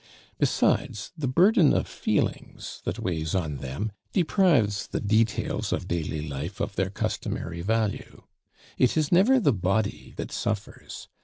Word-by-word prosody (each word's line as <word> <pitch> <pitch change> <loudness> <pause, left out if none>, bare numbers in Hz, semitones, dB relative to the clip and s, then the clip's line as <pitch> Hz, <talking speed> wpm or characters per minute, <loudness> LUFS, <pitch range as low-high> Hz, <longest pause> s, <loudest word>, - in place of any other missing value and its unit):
Besides, 105 0 +1
the 155 -5 -2
burden 175 - +5
of - - 0
feelings - - -2
that - - -2
weighs 80 -2 -2
on 80 -6 -1
them 70 +12 -4 0.2
deprives 155 - +2
the - - -3
details 110 +1 0
of - - -2
daily 80 -3 -2
life 75 +7 -5
of 100 - -3
their 95 0 0
customary 85 -3 -3
value. 110 +1 -2 0.6
It 125 +4 +3
is 155 -2 +1
never 210 +10 +5
the 145 - +3
body 100 +2 -1
that - - -5
suffers. 105 -1 -4
105 Hz, 140 wpm, -26 LUFS, 85-140 Hz, 0.6 s, burden